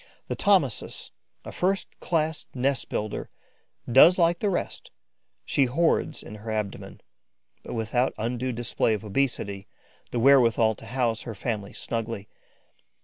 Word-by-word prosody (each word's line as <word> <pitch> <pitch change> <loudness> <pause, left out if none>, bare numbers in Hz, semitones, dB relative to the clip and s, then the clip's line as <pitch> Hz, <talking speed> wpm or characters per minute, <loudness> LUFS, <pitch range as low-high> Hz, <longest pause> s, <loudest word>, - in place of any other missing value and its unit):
The - - -1
Thomisus, 185 - +1 0.3
a - - -6
first 190 +2 -1
class 160 -2 -1
nest 130 0 0
builder, 105 0 -3 0.6
does 145 +9 +7
like 170 -1 +3
the 210 - +1
rest: 180 - -3 0.6
she 140 - +2
hoards 160 +7 +1
in - - -10
her 110 +2 -8
abdomen, 105 -3 -4 0.6
but - - -7
without 120 +3 0
undue 125 +3 -2
display 115 -1 0
of 105 0 -7
obesity, 100 -4 -1 0.4
the - - -3
wherewithal 115 -4 +5
to 110 - -13
house 115 -2 0
her 115 - -7
family 105 -1 -4
snugly. 115 -3 -4
120 Hz, 135 wpm, -26 LUFS, 110-140 Hz, 0.6 s, does